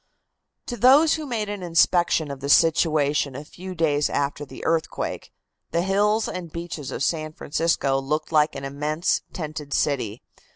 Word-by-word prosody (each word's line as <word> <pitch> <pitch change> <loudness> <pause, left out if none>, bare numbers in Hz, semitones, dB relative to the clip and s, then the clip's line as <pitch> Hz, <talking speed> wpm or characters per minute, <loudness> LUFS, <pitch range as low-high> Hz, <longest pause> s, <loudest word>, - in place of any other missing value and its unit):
To 240 - -5
those 280 +8 +6
who 310 -2 -3
made 225 -5 -2
an 205 -1 -5
inspection 170 -2 +2
of 140 - -7
the 140 +1 -5
situation 150 -3 +3
a 145 +3 -7
few 185 +4 -9
days 150 -3 +1
after 145 +1 -2
the - - -10
earthquake, 165 -1 -2 0.4
the 170 +1 0
hills 210 +3 +2
and 175 -3 -6
beaches 170 -4 -6
of - - -3
San 155 -1 -1
Francisco 145 -3 0
looked 150 +4 -2
like 150 -2 +3
an 135 0 -5
immense 150 +4 -1
tented 155 -4 -5
city. 125 -6 -1
155 Hz, 160 wpm, -24 LUFS, 145-180 Hz, 0.4 s, those